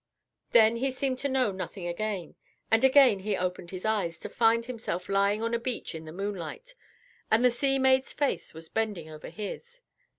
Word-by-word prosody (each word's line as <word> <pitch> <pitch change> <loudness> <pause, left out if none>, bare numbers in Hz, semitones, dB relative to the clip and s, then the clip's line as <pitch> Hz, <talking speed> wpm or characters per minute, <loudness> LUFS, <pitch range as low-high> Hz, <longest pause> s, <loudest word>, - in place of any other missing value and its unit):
Then 225 0 +5
he 270 +3 0
seemed 260 0 -2
to 280 - -1
know 260 -5 +2
nothing 190 -1 -6
again; 190 +1 -3 0.4
and 225 +2 +4
again 265 -6 +6
he 200 0 -1
opened 180 -1 -3
his 185 +1 -7
eyes, 200 -7 0
to - - -6
find 230 0 +3
himself 225 -7 -4
lying 200 +2 +2
on 230 +1 -1
a 235 - +1
beach 245 0 -4
in 160 0 -7
the 155 - -8
moonlight, 200 - -5 0.6
and 230 +3 +4
the 250 - +6
sea 270 +3 +1
maid's 265 0 +3
face 280 - -1
was 160 0 -8
bending 205 -6 -3
over 155 0 -9
his. 480 - -8
220 Hz, 190 wpm, -28 LUFS, 185-255 Hz, 0.6 s, again